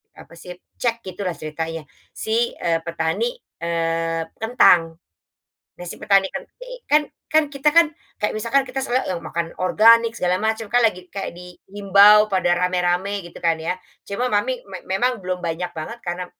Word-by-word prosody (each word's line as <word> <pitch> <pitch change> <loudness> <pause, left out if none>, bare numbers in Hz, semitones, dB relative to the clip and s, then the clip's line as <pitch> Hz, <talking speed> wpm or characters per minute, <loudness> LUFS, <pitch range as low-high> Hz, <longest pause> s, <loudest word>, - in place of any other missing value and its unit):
apa - - -15
sih 180 +1 -9 0.2
cek 235 -2 +1
gitu 185 +1 -8
lah 175 - -3
ceritanya 160 +1 -5 0.3
si, 230 +2 -1
eee, 165 -1 0
petani, 170 - -1 0.2
eee, 165 0 -1 0.2
kentang, 175 -8 +4 0.8
nah 175 - -8
si - - -6
petani 195 -1 +4
kentang 275 - -6 0.2
ini - - -8
kan 300 +1 +5 0.3
kan 310 0 +4
kita 275 +2 +1
kan 335 -1 +8 0.3
kayak 210 - -1
misalkan 235 +5 +2
kita 260 +1 -4
seneng 215 -10 -1
makan 165 +1 -4
organik 230 +4 +5
segala 180 0 +1
macam 220 0 -1
kan 245 0 +4
lagi 185 -5 +1
kayak 195 - -4
di 180 0 -11 0.2
himbau 205 +1 +6
pada 180 -2 +2
rame-rame 180 +2 0
gitu 175 - -12
kan 165 -1 +2
ya, 180 +3 -2 0.2
cuma 220 +6 -3
mami 250 +5 0
me 190 -2 -9
memang 230 +2 0
belum 185 0 -3
banyak 175 +2 -3
banget 230 +10 -6
karena. 180 0 -4
190 Hz, 170 wpm, -21 LUFS, 170-230 Hz, 0.8 s, kan